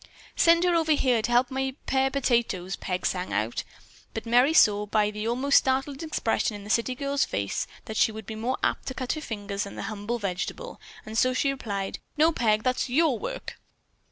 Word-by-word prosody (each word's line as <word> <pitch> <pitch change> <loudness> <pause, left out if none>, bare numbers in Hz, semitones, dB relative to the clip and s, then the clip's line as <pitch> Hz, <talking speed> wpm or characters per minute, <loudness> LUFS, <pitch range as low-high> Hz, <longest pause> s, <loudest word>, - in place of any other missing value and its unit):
"Send 335 +1 +5
her 355 -1 +3
over 320 -2 +3
here 255 -5 +2
to 240 - -2
help 245 +3 +3
me 265 0 -1
pare 265 0 +2
potatoes," 235 -9 0
Peg 180 -1 -3
sang 180 -1 -1
out. 110 +2 -1 0.5
But 225 - -4
Merry 245 +5 +4
saw, 210 -9 +4
by 210 0 +2
the 210 +1 -4
almost 260 +4 +4
startled 270 +2 -1
expression 235 -8 -1
in 205 - -8
the 210 - -5
city 235 +3 +1
girl's 280 +1 0
face, 100 0 -2 0.2
that 220 - -5
she - - +4
would 220 -1 -8
be 220 - -6
more 235 +4 -2
apt - - 0
to 260 - -4
cut 255 -2 -2
her 310 - -5
fingers 205 -6 -4
than 200 - -9
the - - -5
humble 215 +3 -3
vegetable, 205 - -4 0.2
and 220 +1 -2
so 255 +1 +2
she 275 +2 +2
replied: 200 -7 -4 0.2
"No, 315 +2 +5
Peg, 220 -7 +1
that's 255 0 0
your 295 +1 +2
work. - - -6
240 Hz, 205 wpm, -26 LUFS, 210-275 Hz, 0.5 s, Send